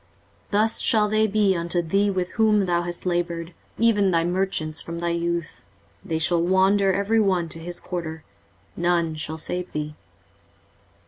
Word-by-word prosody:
23:047:015 - - -37
Thus 215 +2 +3
shall 215 -2 +4
they 215 +1 +2
be 205 -2 +2
unto 170 +1 -1
thee 195 +5 +1
with 185 -2 -2
whom 215 -3 +3
thou 175 -1 +1
hast 175 +1 -6
laboured, 170 -1 -2 0.2
even 210 -4 +3
thy 165 -2 +2
merchants, 175 -4 -1
from 170 0 -7
thy 170 0 -1
youth: 170 -1 -3 0.4
they 165 -5 -2
shall 170 +1 +1
wander 190 +2 +3
every 200 +4 +1
one 185 -5 +1
to 165 - -5
his 175 +1 -6
quarter; 160 -3 -6 0.5
none 170 -2 +1
shall 155 0 -4
save 180 +3 -4
thee. 150 0 -4
175 Hz, 165 wpm, -23 LUFS, 170-200 Hz, 0.5 s, shall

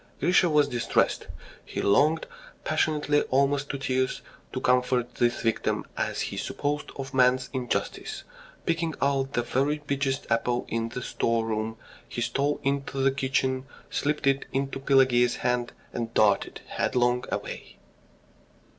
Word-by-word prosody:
Grisha 180 0 +4
was 150 -2 +4
distressed. 120 -1 +1 0.4
He - - -6
longed 150 +10 +3 0.4
passionately, 150 -1 +2
almost 140 +1 +2
to 140 - -2
tears, 130 -1 -1 0.3
to - - -3
comfort 125 -1 +2
this 120 0 +1
victim, 115 -1 0
as - - -1
he - - -3
supposed, 145 0 -2
of 135 0 -6
man's 125 0 +3
injustice. 125 -2 -3 0.4
Picking 165 -1 0
out 135 -1 +1
the 120 - +1
very 135 +5 +1
biggest 140 -1 -1
apple 120 +1 +1
in 115 0 -2
the 125 +1 -5
store 115 -1 0
room 110 0 -2 0.3
he - - -5
stole 135 +5 0
into 140 0 -1
the 135 0 +3
kitchen, 130 -1 0 0.2
slipped 150 0 -1
it 135 0 +2
into 135 0 -2
Pelageya's 130 -3 +4
hand, 125 -1 0 0.2
and 115 -1 -3
darted 100 -2 +2
headlong 125 0 +1
away. - - -5
130 Hz, 135 wpm, -27 LUFS, 120-140 Hz, 0.4 s, Grisha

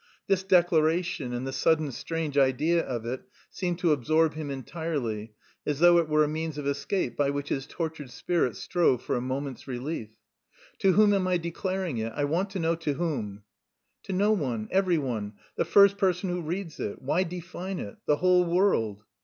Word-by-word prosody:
This 195 -1 +2
declaration 170 -5 +2
and 120 +1 -3
the 135 - -3
sudden 150 +3 +2
strange 160 +2 -4
idea 145 +5 +3
of 120 -3 -4
it 125 +2 -3 0.3
seemed 175 -2 -2
to 175 -2 +2
absorb 155 +3 +2
him 155 -1 -5
entirely, 130 -7 -4 0.3
as 150 - -1
though 175 +2 +6
it 165 -2 -1
were 155 0 +4
a - - +1
means 155 0 -3
of 145 - -4
escape 140 +2 -1
by 145 -1 +1
which 140 0 -3
his 135 0 -2
tortured 160 -5 -5
spirit 125 - 0
strove 145 - +1
for - - -1
a 120 - -1
moment's 130 +1 -4
relief. 125 -2 -4 0.7
"To 190 -1 +4
whom 210 +1 +5
am 190 -2 +1
I 180 -1 +2
declaring 175 - -3
it? 110 0 -3
I 145 - -1
want 170 +7 0
to 195 - -5
know 165 0 +2
to 155 -3 -1
whom?" 110 -12 -3 0.6
"To - - -7
no 205 +3 +3
one, 125 - -1
every 185 -3 +3
one, 115 -8 -3 0.2
the - - 0
first 200 0 +5
person 185 -2 +1
who 175 0 -2
reads 170 +1 -5
it. 100 - -4
Why 145 +7 +1
define 180 +1 -5
it? 100 - -7
The 150 - +4
whole 180 +1 +4
world!" 170 - +1
160 Hz, 190 wpm, -27 LUFS, 130-180 Hz, 0.7 s, though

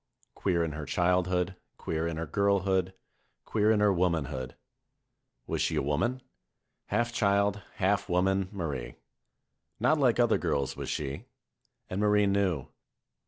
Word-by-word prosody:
Queer 85 -4 0
in 80 - -2
her 75 -1 -6
childhood, 90 +2 +1 0.2
queer 80 +1 -2
in 85 -1 -3
her 85 - -2
girlhood, 95 0 +1 0.5
queer 105 -1 +2
in 110 -1 +3
her 105 -1 +4
womanhood. 80 -8 -1 0.9
Was - - -2
she - - +1
a - - +1
woman? 120 - 0 0.6
Half 120 0 0
child, 100 -1 +2
half 95 +1 +1
woman, 95 +1 +1
Marie. 70 - -4 0.8
Hot 155 0 +3
like 125 -4 +3
other 120 -2 +4
girls 70 -1 -1
was - - -5
she. 70 -2 -4 0.6
And 95 +2 -3
Marie 105 0 +4
knew. 100 -7 +1
95 Hz, 135 wpm, -29 LUFS, 80-100 Hz, 0.9 s, her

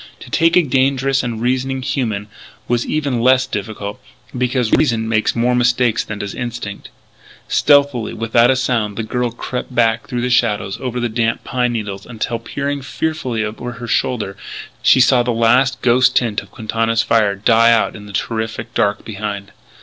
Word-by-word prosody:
To - - -11
take 165 +1 +3
a 180 - +5
dangerous 135 0 +1
and 120 -3 -4
reasoning 130 +2 -1
human 110 -7 -2 0.4
was 120 -1 0
even 140 -6 -1
less 130 +1 +4
difficult, 105 -2 -5 0.3
because 125 -2 0
reason 115 -7 +2
makes 110 -1 +1
more 120 +1 +2
mistakes 125 -1 +2
than 110 - -6
does 100 -1 -5
instinct. 120 -4 -6 0.6
Stealthily, 140 -5 +3
without 115 +1 +3
a 130 - +4
sound, 120 -6 -1
the 115 - -2
girl 125 +2 -1
crept 125 +2 -6
back 115 -1 +2
through 120 -1 -3
the 125 +1 -1
shadows 105 -5 +1
over 125 -1 -3
the 120 - 0
damp 115 0 -1
pine 125 -2 -1
needles, 100 -3 -5
until, 115 0 -3
peering 140 +4 -3
fearfully 130 -5 -2
over 120 +3 -6
her 120 0 -8
shoulder, 110 -4 -1 0.5
she - - +5
saw 125 0 +5
the 120 - -2
last 120 +2 +2
ghost 125 +1 +4
tint 115 -4 +1
of - - -16
Quintana's 115 0 -1
fire 105 -3 +2
die 115 +3 +4
out 115 -1 +2
in 105 -1 -10
the 100 - -11
terrific 110 +2 -3
dark 100 0 0
behind. 100 -2 -5
120 Hz, 175 wpm, -18 LUFS, 110-125 Hz, 0.6 s, a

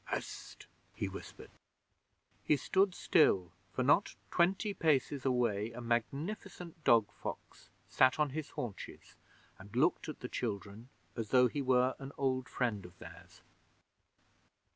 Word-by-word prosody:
'Hst!' - - -6 0.3
he - - -2
whispered. - - -10 0.9
He 150 - +3
stood 190 +6 +2
still, 95 - +3 0.2
for 130 - -1
not 145 +10 +3 0.2
twenty 190 +4 +2
paces 145 -5 +1
away 115 -4 +1
a 125 - -7
magnificent 155 - -3
dog 115 -5 +4
fox - - -8 0.2
sat 130 -1 +4
on 150 -2 +1
his 155 +1 -4
haunches 115 -5 -7 0.4
and 100 +3 -12
looked 155 +5 +2
at 155 - -8
the 125 - -4
children 105 0 -5 0.3
as 115 -3 -4
though 125 -1 +6
he 140 +4 -3
were 130 -1 +3
an 135 +1 -8
old 130 -2 0
friend 115 -6 -1
of 90 0 -13
theirs. - - -13
130 Hz, 135 wpm, -33 LUFS, 115-150 Hz, 0.9 s, though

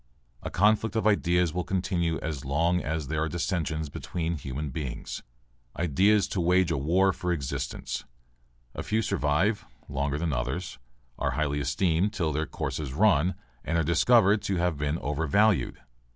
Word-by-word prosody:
A - - -4
conflict 105 +3 +2
of 110 - 0
ideas 90 -5 +2
will 90 0 -1
continue 90 -3 0
as 75 -4 -4
long 85 +6 +1
as 80 -1 -3
there 80 +2 -1
are 80 - 0
dissensions 80 -2 -2
between 85 +3 -3
human 70 0 -5
beings. 65 -3 -5 0.6
Ideas 95 +6 +3
to 90 - -1
wage 90 +1 +3
a - - 0
war 90 +7 +3
for 90 0 -2
existence. 70 -3 -3 0.7
A - - -4
few 110 +1 0
survive 80 - +1 0.2
longer 70 +1 -1
than 80 -1 -1
others, 65 +6 -3 0.4
are - - 0
highly 75 -2 0
esteemed 80 +7 +1
till 80 -3 -1
their 80 +1 -1
course 70 +1 -4
is 70 -4 -4
run 95 -1 +3 0.3
and 85 - -1
are 85 - +2
discovered 100 +6 +4
to 100 - -1
have 90 -2 +1
been 75 +2 -1
overvalued. 80 +8 +1
85 Hz, 160 wpm, -27 LUFS, 75-95 Hz, 0.7 s, discovered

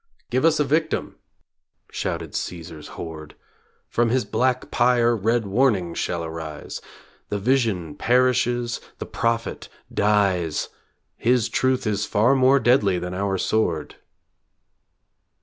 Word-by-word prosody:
Give 130 +5 +2
us 165 -2 +4
a - - +4
victim, 155 +3 -1 0.7
shouted - - -3
Caesar's 80 -3 -6
horde, 80 -2 -8 0.5
From 120 0 +1
his 125 +1 +1
black 130 0 0
pyre 120 -1 +3
red 115 +2 +1
warnings 100 -5 +1
shall 85 -1 -2
arise, 80 -2 -7 0.5
The 105 - -1
vision 105 - 0
perishes, 120 0 +1 0.2
the - - -5
prophet 115 0 -2 0.2
dies... 100 -6 +1 0.5
His 120 -1 +2
truth 130 -1 +1
is 105 -1 0
far 115 +6 +3
more 135 +1 +5
deadly 110 -6 +3
than 90 +1 -4
our 95 +1 -1
sword! 85 -8 -1
115 Hz, 115 wpm, -23 LUFS, 90-125 Hz, 0.7 s, more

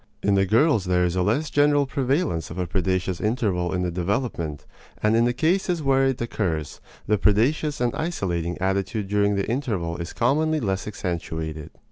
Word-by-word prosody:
In 100 - +3
the 95 0 +3
girls 115 - +3
there 90 -1 +2
is 90 0 -1
a 90 - +1
less 115 +11 0
general 145 0 +4
prevalence 135 - -1
of 85 - -8
a 90 - -1
predaceous 95 0 -1
interval 100 -6 0
in 90 -1 -1
the 90 - -1
development; 85 - -2 0.4
and 105 +1 +3
in 115 +1 +4
the 120 - +2
cases 170 +3 0
where 135 -1 +3
it 135 -2 -1
occurs, 85 -10 -3 0.2
the 105 -1 +1
predaceous 140 +8 +2
and 120 -1 +1
isolating 90 - -2
attitude 95 +3 -1
during 100 0 +2
the 100 - -1
interval 105 -10 -2
is 85 -1 -5
commonly 155 +6 +1
less 95 -5 -2
accentuated. 80 -5 -4
100 Hz, 175 wpm, -24 LUFS, 90-135 Hz, 0.4 s, general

